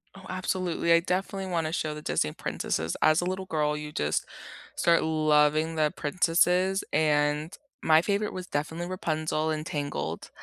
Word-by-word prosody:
Oh, 195 Hz, -1 st, -13 dB
absolutely, 185 Hz, -2 st, -1 dB
I 170 Hz, -, +6 dB
definitely 190 Hz, +2 st, -2 dB
want 165 Hz, -2 st, 0 dB
to 160 Hz, -, -4 dB
show 155 Hz, -3 st, -1 dB
the 150 Hz, -, -8 dB
Disney 75 Hz, -, 0 dB
princesses. 80 Hz, +1 st, -3 dB
As 155 Hz, +2 st, +4 dB
a -, -, -2 dB
little 185 Hz, +1 st, -3 dB
girl, 150 Hz, -4 st, 0 dB
you 150 Hz, 0 st, -6 dB
just 75 Hz, -, -1 dB, 0.5 s
start 170 Hz, -1 st, +3 dB
loving 155 Hz, 0 st, +2 dB
the 155 Hz, -1 st, +2 dB
princesses, 180 Hz, +4 st, +2 dB
and 150 Hz, +2 st, +1 dB, 0.3 s
my 160 Hz, 0 st, +5 dB
favorite 205 Hz, +2 st, -1 dB
was 185 Hz, -1 st, -6 dB
definitely 160 Hz, +3 st, -3 dB
Rapunzel 155 Hz, -3 st, -1 dB
in 155 Hz, 0 st, -2 dB
Tangled, 145 Hz, -, -4 dB
160 Hz, 160 wpm, -27 LUFS, 150-180 Hz, 0.5 s, I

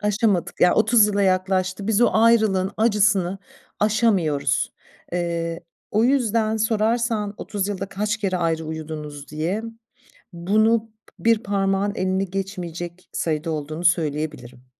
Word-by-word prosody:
Aşamadık, 205 Hz, -4 st, 0 dB
yani 180 Hz, -, +5 dB
30 220 Hz, 0 st, +5 dB
yıla 205 Hz, -1 st, 0 dB
yaklaştı. 185 Hz, +1 st, 0 dB
Biz 220 Hz, 0 st, +2 dB
o 240 Hz, -, +6 dB
ayrılığın 220 Hz, -4 st, +3 dB
acısını 205 Hz, -4 st, +2 dB, 0.4 s
aşamıyoruz. 205 Hz, -9 st, +1 dB, 0.4 s
Eee, 170 Hz, -1 st, -2 dB, 0.3 s
o 215 Hz, +2 st, +2 dB
yüzden 230 Hz, -4 st, +2 dB
sorarsan, 220 Hz, -1 st, 0 dB
"30 200 Hz, -1 st, -3 dB
yılda 195 Hz, -1 st, -3 dB
kaç 210 Hz, +3 st, -2 dB
kere 195 Hz, -4 st, -1 dB
ayrı 165 Hz, -2 st, -1 dB
uyudunuz?" 155 Hz, -2 st, -7 dB
diye, 165 Hz, +8 st, -2 dB, 0.7 s
bunu 215 Hz, +6 st, +1 dB, 0.3 s
bir 230 Hz, -1 st, +2 dB
parmağın 195 Hz, 0 st, 0 dB
elini 190 Hz, +1 st, -1 dB
geçmeyecek 180 Hz, -2 st, -6 dB
sayıda 160 Hz, 0 st, -2 dB
olduğunu 155 Hz, +2 st, -4 dB
söyleyebilirim. 150 Hz, -7 st, -1 dB
195 Hz, 120 wpm, -22 LUFS, 170-215 Hz, 0.7 s, o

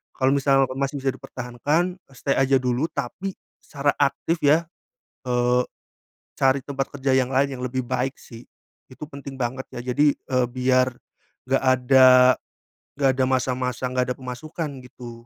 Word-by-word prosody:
Kalau 130 Hz, +1 st, +2 dB
misal 135 Hz, -1 st, +3 dB
masih 140 Hz, +1 st, -1 dB
bisa 135 Hz, -1 st, +1 dB
dipertahankan, 135 Hz, +8 st, -2 dB
eee, 135 Hz, -7 st, -24 dB
stay 140 Hz, -, 0 dB
aja 135 Hz, 0 st, +3 dB
dulu, 125 Hz, +5 st, 0 dB
tapi 180 Hz, +9 st, -4 dB, 0.2 s
secara 145 Hz, 0 st, -1 dB
aktif, 155 Hz, +4 st, +1 dB
ya, 155 Hz, +4 st, +5 dB, 0.6 s
eee, 125 Hz, 0 st, +2 dB, 0.7 s
cari 135 Hz, +1 st, +3 dB
tempat 135 Hz, -1 st, -3 dB
kerja 135 Hz, 0 st, +1 dB
yang 130 Hz, 0 st, +1 dB
lain 135 Hz, 0 st, +1 dB
yang -, -, -7 dB
lebih 130 Hz, +1 st, -2 dB
baik, 130 Hz, +2 st, -2 dB
sih, 115 Hz, 0 st, -12 dB, 0.5 s
itu 150 Hz, -, -8 dB
penting 140 Hz, -2 st, -9 dB
banget, 130 Hz, +2 st, -2 dB
ya, 120 Hz, -, -6 dB
jadi, 145 Hz, 0 st, +4 dB
eee, 125 Hz, -2 st, -1 dB
biar 130 Hz, 0 st, +2 dB, 0.6 s
nggak 135 Hz, -, +2 dB
ada 130 Hz, -1 st, +6 dB, 0.6 s
nggak 135 Hz, -2 st, +3 dB
ada 130 Hz, -, +3 dB
masa-masa 130 Hz, -1 st, -1 dB
nggak 125 Hz, 0 st, 0 dB
ada -, -, -20 dB
pemasukan, 150 Hz, +5 st, -6 dB, 0.2 s
gitu. 120 Hz, -2 st, -11 dB
130 Hz, 155 wpm, -23 LUFS, 125-140 Hz, 0.7 s, ada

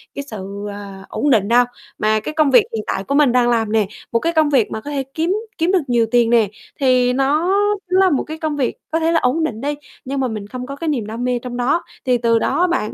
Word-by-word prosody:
cái 280 Hz, -, -4 dB
sự, 200 Hz, -5 st, -7 dB
ờ, 200 Hz, -1 st, -9 dB
ổn 295 Hz, -, -1 dB
định 210 Hz, -7 st, +3 dB
đâu. 245 Hz, +2 st, +5 dB, 0.3 s
Mà 215 Hz, 0 st, +2 dB
cái 305 Hz, -, -6 dB
công 305 Hz, -3 st, +2 dB
việc 245 Hz, -4 st, +7 dB
hiện 215 Hz, -, -3 dB
tại 195 Hz, -, -2 dB
của 280 Hz, -, -2 dB
mình 285 Hz, -3 st, +5 dB
đang 245 Hz, -1 st, +3 dB
làm 225 Hz, -3 st, +1 dB
nè, 220 Hz, -3 st, +2 dB, 0.2 s
một 230 Hz, -, +2 dB
cái 335 Hz, +7 st, -1 dB
công 315 Hz, -2 st, +3 dB
việc 260 Hz, -7 st, +2 dB
mà 220 Hz, -, -4 dB
có 290 Hz, -, -7 dB
thể 275 Hz, -2 st, -1 dB
kiếm 330 Hz, +3 st, 0 dB, 0.2 s
kiếm 340 Hz, +3 st, +1 dB
được 380 Hz, -, +3 dB
nhiều 240 Hz, -2 st, +2 dB
tiền 240 Hz, -2 st, +4 dB
nè, 230 Hz, -3 st, +4 dB, 0.3 s
thì 255 Hz, -2 st, +3 dB
nó 280 Hz, +6 st, +1 dB, 0.4 s
nó 370 Hz, -, +4 dB
là 380 Hz, -1 st, +5 dB
một 285 Hz, -, +1 dB
cái 315 Hz, +1 st, -7 dB
công 310 Hz, -1 st, -2 dB
việc 265 Hz, -4 st, -1 dB
có 325 Hz, -, +1 dB
thể 325 Hz, 0 st, +1 dB
là 330 Hz, -, +3 dB
ổn 280 Hz, +6 st, +1 dB
định 230 Hz, -8 st, -3 dB
đi. 290 Hz, +2 st, -1 dB, 0.3 s
Nhưng 275 Hz, +1 st, -3 dB
mà 260 Hz, -, +1 dB
mình 215 Hz, -3 st, -5 dB
không 250 Hz, +3 st, -6 dB
có 275 Hz, +2 st, -7 dB
cái 330 Hz, +3 st, -5 dB
niềm 265 Hz, -8 st, -1 dB
đam 225 Hz, +3 st, -5 dB
mê 250 Hz, -1 st, 0 dB
trong 245 Hz, 0 st, -6 dB
đó 250 Hz, +8 st, +1 dB, 0.2 s
thì 250 Hz, -2 st, +3 dB
từ 230 Hz, -1 st, +2 dB
đó 335 Hz, -, 0 dB
á 360 Hz, -, +4 dB
bạn, 275 Hz, -11 st, -1 dB
250 Hz, 280 wpm, -19 LUFS, 225-295 Hz, 0.4 s, việc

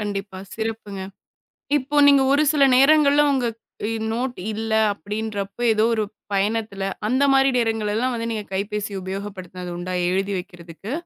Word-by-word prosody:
கண்டிப்பா. 200 Hz, -2 st, -4 dB, 0.2 s
சிறப்புங்க. 220 Hz, -3 st, -5 dB, 0.8 s
இப்ப 290 Hz, +2 st, +1 dB
நீங்க 280 Hz, -1 st, +6 dB
ஒரு 285 Hz, +2 st, +4 dB
சில 290 Hz, -2 st, +4 dB
நேரங்கள்ல, 290 Hz, +1 st, +5 dB
உங்க 260 Hz, -3 st, 0 dB, 0.4 s
இ -, -, -1 dB, 0.2 s
நோட் 250 Hz, +2 st, -2 dB, 0.2 s
இல்ல, 220 Hz, +1 st, -4 dB, 0.2 s
அப்படின்றப்போ 205 Hz, +2 st, -5 dB
ஏதோ 215 Hz, -, +2 dB
ஒரு 215 Hz, -1 st, 0 dB, 0.3 s
பயணத்துல, 205 Hz, 0 st, -1 dB, 0.2 s
அந்த 260 Hz, +5 st, +1 dB
மாரி 270 Hz, 0 st, +5 dB
நேரங்கள்லாம் 225 Hz, +1 st, 0 dB
வந்து, 230 Hz, 0 st, -3 dB
நீங்க 215 Hz, -2 st, -4 dB
கைபேசி 205 Hz, +1 st, -3 dB
உபயோகப்படுத்துனது 185 Hz, -2 st, -6 dB
உண்டா 180 Hz, +1 st, -4 dB, 0.2 s
எழுதி 195 Hz, +2 st, -1 dB
வைக்கிறதுக்கு? 175 Hz, +4 st, -9 dB
215 Hz, 135 wpm, -22 LUFS, 195-245 Hz, 0.8 s, நீங்க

